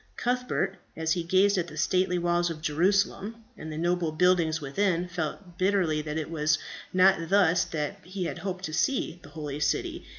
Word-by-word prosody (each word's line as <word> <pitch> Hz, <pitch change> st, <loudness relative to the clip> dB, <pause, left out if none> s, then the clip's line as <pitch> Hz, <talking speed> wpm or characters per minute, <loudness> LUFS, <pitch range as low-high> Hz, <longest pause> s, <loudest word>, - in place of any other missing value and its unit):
Cuthbert, 245 Hz, -6 st, -1 dB, 0.2 s
as 160 Hz, 0 st, -1 dB
he 175 Hz, 0 st, +2 dB
gazed 190 Hz, +3 st, +3 dB
at 175 Hz, -, -2 dB
the -, -, -10 dB
stately 185 Hz, -1 st, +1 dB
walls 175 Hz, 0 st, +1 dB
of 165 Hz, -2 st, -5 dB
Jerusalem, 195 Hz, +7 st, +1 dB
and 160 Hz, -6 st, -8 dB
the 155 Hz, -, -5 dB
noble 175 Hz, 0 st, 0 dB
buildings 165 Hz, -1 st, +3 dB
within, 175 Hz, +4 st, 0 dB
felt 175 Hz, +1 st, -5 dB
bitterly 185 Hz, -5 st, +2 dB
that 150 Hz, 0 st, -4 dB
it 160 Hz, 0 st, -4 dB
was 155 Hz, -1 st, +2 dB, 0.3 s
not 185 Hz, -3 st, +4 dB
thus 185 Hz, -3 st, +4 dB
that 155 Hz, +5 st, -4 dB
he 185 Hz, 0 st, -4 dB
had -, -, -4 dB
hoped 190 Hz, -1 st, -4 dB
to 155 Hz, -, -5 dB
see 175 Hz, -, 0 dB
the 145 Hz, -, -13 dB
holy 145 Hz, -1 st, -5 dB
city. 150 Hz, -1 st, -1 dB
175 Hz, 185 wpm, -28 LUFS, 160-190 Hz, 0.3 s, not